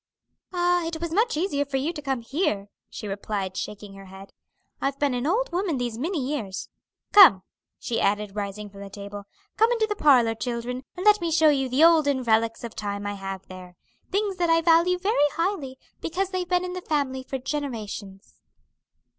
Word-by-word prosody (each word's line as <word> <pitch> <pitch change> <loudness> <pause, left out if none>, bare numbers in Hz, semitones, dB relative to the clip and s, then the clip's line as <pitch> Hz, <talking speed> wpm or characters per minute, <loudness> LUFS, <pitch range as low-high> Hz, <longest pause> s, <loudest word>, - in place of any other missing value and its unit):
"Ah, 355 -1 +1
it 330 -1 -4
was 335 -1 -4
much 435 -2 +2
easier 310 -4 0
for 280 -1 -3
you 295 +6 -1
to 295 - -7
come 270 -4 -2
here," 230 - -1 0.2
she 210 - -7
replied, 195 -1 -4
shaking 205 0 -6
her 195 0 -12
head. 190 +1 -13 0.5
"I've 275 0 -1
been 285 -2 +1
an 245 +3 -1
old 455 +8 +1
woman 350 -4 -1
these 240 -2 -3
many 340 +7 -2
years. 255 -8 -4 0.4
Come," 340 - +8 0.3
she 235 - -2
added, 205 0 0
rising 205 0 -4
from 200 0 -12
the 200 - -8
table, 200 0 -8 0.3
"come 450 +2 +4
into 455 -2 +2
the 420 -1 -3
parlor, 255 - +4
children, 245 +2 -4 0.2
and 365 - -4
let 420 -2 +6
me 340 - -1
show 320 -1 +5
you 270 -3 +1
the 265 +5 +3
olden 300 -6 +4
relics 225 0 +1
of 230 -1 -7
time 205 -1 -4
I 205 - -2
have 195 -1 -6
there 185 -1 -11 0.4
things 400 -1 0
that 345 -2 +1
I 330 0 +4
value 340 +2 +4
very 360 -6 +2
highly, 330 -7 -2 0.2
because 375 +3 -2
they've 365 -2 -3
been 360 0 +2
in 360 - -5
the 365 - -5
family 280 -5 -1
for 265 +1 -5
generations." 225 -8 -6
270 Hz, 195 wpm, -25 LUFS, 210-345 Hz, 0.5 s, Come